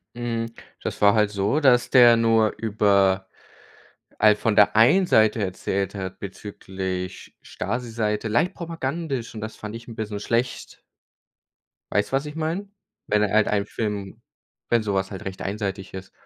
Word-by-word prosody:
Hm, 115 -1 -3 0.3
das - - -5
war 100 0 +6
halt 105 -2 +3
so, 105 +8 0
dass 125 -4 +4
der 120 -2 +7
nur 115 -1 +3
über 100 -3 +2 0.9
all 105 -1 +6
von 110 0 0
der 105 +1 +5
einen 160 +13 +6
Seite 110 -3 +3
erzählt 95 +1 -2
hat 95 -1 -6
bezüglich 95 -2 -6
Stasi-Seite 115 -3 -3
leicht 160 - +1
propagandisch, 155 -7 -4
und 110 - -6
das 110 0 -7
fand 105 +1 -7
ich 115 +1 -10
'n 115 - -9
bisschen 105 -2 -5
schlecht. 120 +4 -2 1.1
Weißt 105 0 +1
du, - - -12
was 135 +2 0
ich 150 +1 -7
meine? 165 +6 -3 0.4
Wenn 105 0 +2
halt 105 +1 +2
ein 100 -1 0
Film 105 -3 -4 0.5
wenn 120 -1 +3
sowas 95 -2 -1
halt 95 - -8
recht 95 -1 -6
einseitig 100 -1 -4
ist. 95 0 -8
110 Hz, 155 wpm, -24 LUFS, 100-120 Hz, 1.1 s, der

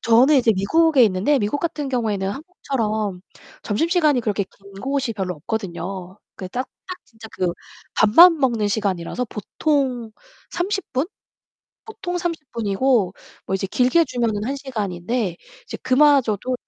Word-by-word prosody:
저는 245 +6 +5
이제 240 -4 +4
미국에 285 - +3
있는데 210 +8 +2
미국 210 +7 -1
같은 300 -4 -2
경우에는 215 -6 -1
한국처럼 220 - -3 0.4
점심시간이 305 - +2
그렇게 205 -3 -1
긴 195 +1 -19
곳이 270 -1 -1
별로 190 -4 -3
없거든요. 190 +1 -5 0.2
그 185 - -7
딱, 255 +7 -4 0.2
딱 365 -1 -6
진짜 225 -1 -13
그 180 -2 -1 0.4
밥만 330 +11 +7
먹는 235 -6 +1
시간이라서 200 +2 -1
보통 250 - -1 0.4
30 390 +3 -3
분? 265 +6 0 0.8
보통 385 -5 -5
30 335 -5 -4
분이고 220 -2 +1 0.3
뭐 - - -1
이제 195 0 -1
길게 255 - +3
주면은 225 -4 -1
1 265 +4 -2
시간인데 210 -6 -3 0.3
이제 - - -7
그마저도 255 -4 +3
235 Hz, 290 characters per minute, -22 LUFS, 200-285 Hz, 0.8 s, 밥만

